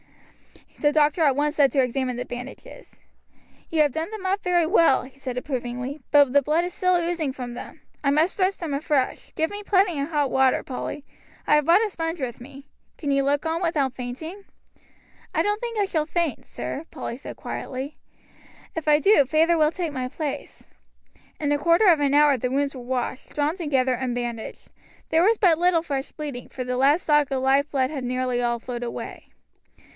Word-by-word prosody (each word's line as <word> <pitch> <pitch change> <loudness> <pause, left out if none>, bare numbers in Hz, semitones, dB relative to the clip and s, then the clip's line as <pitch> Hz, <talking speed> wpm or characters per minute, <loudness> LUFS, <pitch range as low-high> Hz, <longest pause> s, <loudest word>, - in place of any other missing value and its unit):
The 295 - +3
doctor 300 +2 +2
at 285 -4 +4
once 295 +2 0
set 280 -2 +5
to - - -3
to 265 - +5
examine 255 0 -1
the 245 - -4
bandages. 250 - -10 0.7
"You 315 -2 +3
have 295 - +1
done 320 +6 -3
them 430 -3 -7
up 390 +2 0
very 350 -2 +2
well," 330 -6 +4
he 270 +1 -14
said 255 -2 -5
approvingly; 250 +1 -4
"but 285 -3 +5
the 285 - +6
blood 310 +5 +1
is 355 - -5
still 365 -1 +2
oozing 340 -4 0
from 245 -2 -6
them. - - -9 0.2
I 280 - +3
must 310 +6 +2
dress 380 0 +1
them 325 -5 -4
afresh; 280 -2 -1
get 320 +1 0
me 410 0 -5
plenty 380 -6 +2
of 285 - -3
hot 290 -4 0
water, 265 -1 +3
Polly, 275 +2 -5 0.4
I - - +3
have 300 -1 +4
brought 360 +7 +5
a - - -3
sponge 325 -1 -3
with 245 -3 -4
me. 275 +2 -12 0.3
Can 290 -3 -2
you 275 0 +3
look 285 +3 0
on 325 +2 -1
without 295 -7 0
fainting?" 290 +11 -7 0.9
"I - - +3
don't 415 +1 -1
think 470 -2 -4
I 410 - +2
shall 310 -5 -1
faint, 335 -3 -2
sir," 300 - -5
Polly - - -6
said 270 - -9
quietly; 265 +3 -5 0.8
"if 325 -2 -5
I 300 -1 +6
do, 390 -1 +5
feyther 320 +3 +3
will 305 0 +4
take 340 -3 -3
my 255 -2 -2
place." 290 +2 -6 0.7
In 290 -1 0
a 290 - +2
quarter 335 +7 +4
of 330 -4 +5
an 285 -1 +2
hour 295 -2 +5
the 250 - -1
wounds 280 +2 0
were 260 - -8
washed, 255 +1 -4
drawn 300 +2 +1
together, 270 -7 +1
and 250 -1 -2
bandaged. 240 -2 -5 0.4
There 320 - +3
was 435 +5 +4
but 345 -6 +4
little 350 -2 +3
fresh 275 -4 -3
bleeding, 285 -5 -7
for 255 - -5
the 250 0 -2
lad's 280 +7 +3
stock 295 -2 +3
of 265 -1 -1
life 275 +2 +3
blood 265 -1 0
had 275 -4 -4
nearly 250 0 -1
all 240 0 0
flowed 240 0 -6
away. 240 -1 -6
290 Hz, 205 wpm, -24 LUFS, 260-330 Hz, 0.9 s, the